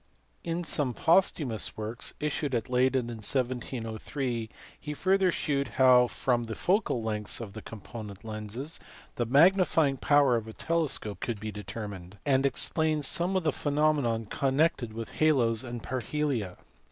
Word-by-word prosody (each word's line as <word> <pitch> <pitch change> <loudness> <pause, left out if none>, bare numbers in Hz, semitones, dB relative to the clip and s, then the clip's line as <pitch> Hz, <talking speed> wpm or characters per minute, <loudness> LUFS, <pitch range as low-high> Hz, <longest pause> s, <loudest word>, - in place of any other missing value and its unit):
In 170 +1 -2
some 140 -6 -1
posthumous 160 - +2
works, 110 +2 -5
issued 150 -2 -1
at 115 +1 -2
Leyden 125 0 +2
in 115 - -6
1703, 120 0 -2 0.3
he 150 - -5
further 190 +2 +3
shewed 140 -4 -1
how 125 -2 +6
from 120 -1 0
the 110 -1 -5
focal 185 - +1
lengths 105 -1 -2
of 110 -4 -7
the 110 - -8
component 105 -2 -9
lenses 110 +8 -6 0.4
the 120 -3 0
magnifying 160 0 +4
power 145 -2 +4
of 110 -1 -5
a 110 - -8
telescope 155 -11 -1
could 115 -4 -3
be 110 +1 -5
determined; 100 -2 -7
and 135 -1 +3
explained 155 +1 +1
some 175 +7 +2
of 185 - +1
the 155 - +2
phenomena 145 -6 +1
connected 135 -1 +1
with 115 0 -6
halos 125 -7 +3
and 120 -2 -6
parhelia. 130 -6 -2
125 Hz, 145 wpm, -29 LUFS, 110-150 Hz, 0.4 s, how